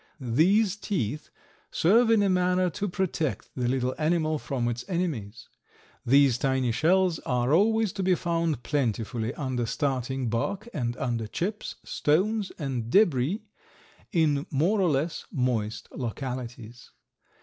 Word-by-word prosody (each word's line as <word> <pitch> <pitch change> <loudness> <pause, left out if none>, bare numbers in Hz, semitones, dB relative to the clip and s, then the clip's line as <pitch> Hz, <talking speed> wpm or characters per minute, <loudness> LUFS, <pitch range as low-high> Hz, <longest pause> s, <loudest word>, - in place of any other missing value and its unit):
These 180 - +2
teeth 155 - -3 0.4
serve 225 +7 +4
in 220 -3 +4
a - - +3
manner 180 0 +2
to 205 +5 -3
protect 175 -6 -2
the 125 -2 -1
little 130 0 0
animal 155 -1 +1
from 125 -4 -2
its 120 0 -3
enemies. 150 - -3 0.6
These 135 -1 +4
tiny 130 -3 +1
shells 175 +6 +2
are 125 +1 0
always 220 +3 +3
to 200 - -3
be 185 -1 +3
found 165 -7 -1
plentifully 115 -4 -1
under 130 -4 -2
starting 130 +1 -1
bark 190 - -2
and 120 -2 -2
under 115 -3 -2
chips, 200 - -3
stones 195 +7 +1
and 130 -7 -3
debris, 175 - +3 0.7
in 155 -3 +1
more 175 +8 +2
or 180 - +3
less 150 +3 -1
moist 120 -5 -1
localities. 120 -2 -6
145 Hz, 130 wpm, -27 LUFS, 125-185 Hz, 0.7 s, serve